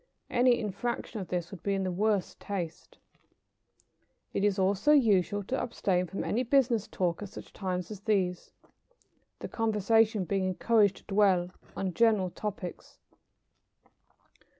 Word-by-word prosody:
Any 245 -1 +4
infraction 215 +2 -3
of 185 - -5
this 175 -1 -3
would 195 - -9
be 200 -1 0
in 195 - -1
the 185 - -1
worst 205 +1 0
taste. 180 -5 -6 1.4
It - - 0
is 205 -1 +2
also 200 +8 +3
usual 205 -7 +3
to 260 +7 -2
abstain 185 -6 0
from 195 - -4
any 235 - 0
business 245 -4 +2
talk 175 -1 -1
at 205 - -6
such - - -11
times 185 -1 -3
as 210 - -7
these, 190 -4 -1 0.9
the - - -4
conversation 220 -2 +2
being 195 +1 0
encouraged 205 +1 +3
to - - -16
dwell 195 -3 +2 0.3
on 190 -2 -2
general 210 -4 +3
topics. 195 -4 -6
200 Hz, 140 wpm, -29 LUFS, 185-220 Hz, 1.4 s, Any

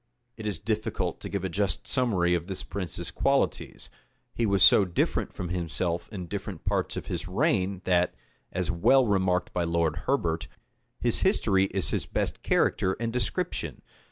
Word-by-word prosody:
It 110 -2 -6
is 105 - -1
difficult 110 -1 -2
to - - -6
give 100 -2 -3
a - - +1
just 95 0 -1
summary 100 -10 +2
of 85 0 -1
this 95 -2 -3
prince's 95 -5 -5
qualities: - - 0 0.4
he 115 - 0
was 100 -2 +4
so 95 - +8
different 90 -3 0
from 90 - -5
himself 85 0 -2
in 95 -5 -5
different 95 -1 -6
parts - - 0
of - - -4
his - - -4
reign, 95 0 +1
that, 90 -1 +2 0.4
as 90 - -1
is - - +3
well 125 +10 +4
remarked 95 -4 +1
by 90 - 0
Lord 85 -2 +1
Herbert, 85 -12 0 0.5
his 120 -2 +1
history 100 - +3
is 95 -1 -2
his - - -1
best - - -2
character 95 - +2
and 115 -1 -2
description. 125 - -2
95 Hz, 170 wpm, -28 LUFS, 85-105 Hz, 0.5 s, so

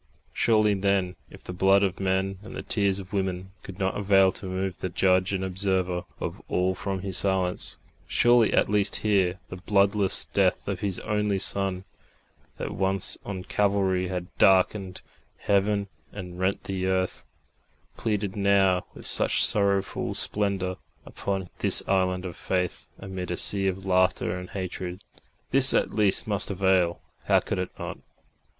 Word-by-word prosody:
Surely 110 -2 +3
then, 95 -2 0
if - - -14
the 90 - -6
blood 95 +2 +4
of 95 -2 -1
men 95 0 -1
and 105 - -10
the - - -5
tears 100 -3 +1
of 95 -1 -9
women 95 -1 -2
could 95 - -10
not 95 -1 -1
avail 95 -2 +4
to 95 - -6
move 95 0 -3
the 95 - -3
Judge 95 +1 +2
and 95 -1 -2
Observer 95 -1 -1
of - - -5
all 90 +1 +1
from 95 +1 -4
His 95 -1 -3
silence, 95 -2 -1 0.3
surely 120 -2 +4
at - - +3
least 105 0 +1
here 95 -3 +2
the 90 - -7
bloodless 100 +1 +2
Death 95 -2 0
of 100 -3 -2
His 95 -2 -2
only 105 -2 0
Son, 95 -1 -1 0.7
that - - -4
once 95 0 0
on 95 -2 -5
Calvary 95 -2 +1
had 90 -1 -5
darkened 95 0 +3 0.3
heaven 100 0 +1 0.2
and 90 -3 -8
rent 95 +1 0
the 95 -1 -3
earth, 95 -1 -1 0.7
pleaded 105 -2 -2
now 100 -2 +2
with - - -11
such - - +3
sorrowful 100 -2 +1
splendour 95 -3 -1 0.3
upon 95 -2 -4
this - - +3
island 95 -1 +1
of 90 -3 -6
faith 90 -1 -2
amid 95 -2 -6
a 90 - -2
sea 100 -1 0
of 95 0 -3
laughter 95 -1 +2
and 90 - -9
hatred 90 -1 -5 0.5
this 135 0 +5
at - - +1
least 105 -3 +2
must 100 -2 +3
avail! 95 -3 +1 0.2
How - - +4
could - - -3
it 90 - -2
not? - - -6
95 Hz, 155 wpm, -26 LUFS, 95-100 Hz, 0.7 s, this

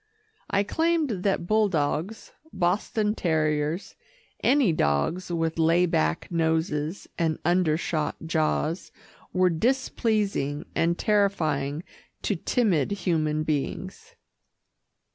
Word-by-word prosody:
I 200 0 +2
claimed 315 - 0
that 195 -3 0
bulldogs, 195 -2 0 0.2
Boston 210 +4 0
terriers, 155 -1 0 0.5
any 260 - +4
dogs 155 - 0
with 165 -1 -1
lay 165 +2 +4
back 80 - 0
noses 160 0 -1
and 160 -2 +1
undershot 165 -3 +1
jaws, 160 +1 -1 0.4
were 185 -1 +3
displeasing 210 - 0
and 170 +1 +1
terrifying 160 -8 +1 0.4
to 205 - 0
timid 180 - +1
human 160 -6 0
beings. 185 - -4
170 Hz, 90 wpm, -26 LUFS, 155-200 Hz, 0.5 s, any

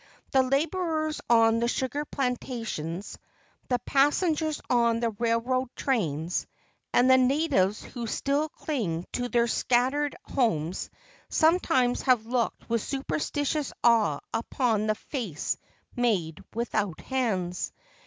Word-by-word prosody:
The 265 - +5
laborers 310 +3 0
on 230 -1 +5
the 235 - +1
sugar 265 +4 -1
plan¬ 255 -4 0
tations, 205 - -5 0.5
the 250 - +3
passengers 305 +2 +2
on 235 -2 +3
the 230 -1 0
railroad 235 +4 0
trains, 170 - -1 0.4
and 245 - +4
the 260 0 +7
natives 255 - +2
who 235 -2 -6
still 285 +6 0
cling 195 - -3
to 245 0 -2
their 235 -1 +3
scattered 255 +5 +1
homes 180 - -1 0.4
sometimes 315 -7 +3
have 250 -4 +3
looked 240 -1 -1
with 230 -1 0
superstitious 290 +2 -2
awe 220 -11 +4
upon 225 -2 0
the 215 - +2
face 215 - -3 0.4
made 200 - 0
without 215 -6 -1
hands. 195 -9 -1
245 Hz, 115 wpm, -27 LUFS, 220-275 Hz, 0.5 s, the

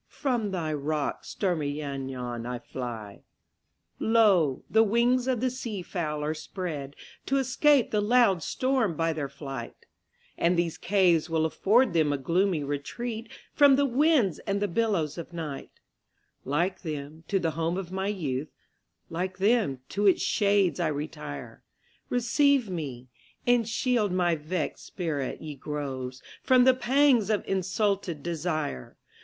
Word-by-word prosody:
From 245 -7 -1
thy 165 -5 -2
rocks, 150 0 -2
stormy 155 -7 -1
Llannon, 130 -5 -4
I 125 0 -3
fly. 115 -5 -7 0.8
Lo! 200 - +3
the 220 - +4
wings 240 +3 +2
of 250 -3 0
the 255 -1 +1
sea 230 -7 -5
fowl 155 -5 -3
are 150 +1 0
spreadTo 155 -4 -5 0.4
escape 270 0 +3
the 210 - +2
loud 210 -5 +4
storm 255 - 0
by 165 0 +1
their 145 -3 -3
flight; 135 -4 -8 0.5
And 170 +1 +3
these 170 -2 -1
caves 175 -4 +3
will 160 -1 +1
afford 210 +7 +3
them 155 -3 +3
a 145 - 0
gloomy 170 +4 +1
retreatFrom 230 - 0
the 285 +1 +3
winds 270 - +3
and 200 -1 -2
the 205 - 0
billows 175 -6 0
of 170 +1 -8
night; 155 -5 -5 0.8
Like 170 +8 0
them, 155 0 -6
to 200 - +1
the 165 -3 0
home 165 +3 -1
of 185 -2 -5
my 190 +1 -2
youth, 150 -8 -2 0.6
Like 185 +3 -3
them, 195 - +2
to 205 +1 +1
its 190 - +4
shades 200 -4 +2
I 175 - +1
retire; 145 - -6 0.5
Receive 250 -1 +2
me, 135 -7 -5 0.4
and 240 -2 +3
shield 225 -3 +1
my 180 -2 +2
vexed 155 +2 -3
spirit, 150 -7 -4
ye 155 -1 -5
groves, 135 -3 -5 0.2
From 255 -1 +5
the 260 +1 +6
pangs 255 -3 +3
of 215 -2 0
insulted 190 -4 -1
desire! 155 - -3
175 Hz, 140 wpm, -27 LUFS, 150-220 Hz, 0.8 s, the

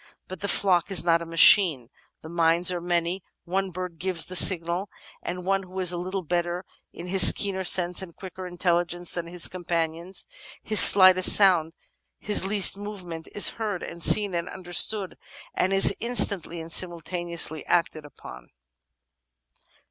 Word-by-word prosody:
But 185 -1 -11
the 200 - -4
flock 185 -4 0
is 195 -3 +1
not 170 -1 +1
a 170 - -9
machine; 165 - +3 0.3
the - - -11
minds 170 +1 +1
are 175 -1 -5
many; 175 +1 -4 0.2
one 190 +2 -4
bird 180 -2 -9
gives 180 -2 0
the 185 - -8
signal 175 +1 +3 0.2
— - - -25
the 180 +1 -7
one 195 +2 -3
who 185 0 -11
is 180 -2 -2
a 175 - -6
little 185 +2 -6
better 175 +2 -4 0.3
in 170 - -11
his 190 +1 +6
keener 195 -2 -3
senses 180 0 0
and 175 -3 -12
quicker 185 -1 -11
intelligence 175 0 -3
than 170 -1 -7
his 175 0 -5
com 180 0 -11
panions; 170 +2 -4 0.4
his 215 - +3
slightest 185 -1 +7
sound, 175 -5 +2 0.4
his 205 -2 0
least 200 -1 +2
movement 185 -6 -10
is 205 - +5
heard 210 -5 -5
and 170 - -11
seen 205 +2 +3
and 170 +1 -5
understood 190 +2 -1 0.3
and 185 - -2
is 195 0 +4
instantly 200 -8 -1
and 165 0 -11
simultaneously 170 -2 -2
acted 160 -2 -2
upon." 130 - -15
180 Hz, 165 wpm, -23 LUFS, 170-190 Hz, 0.4 s, slightest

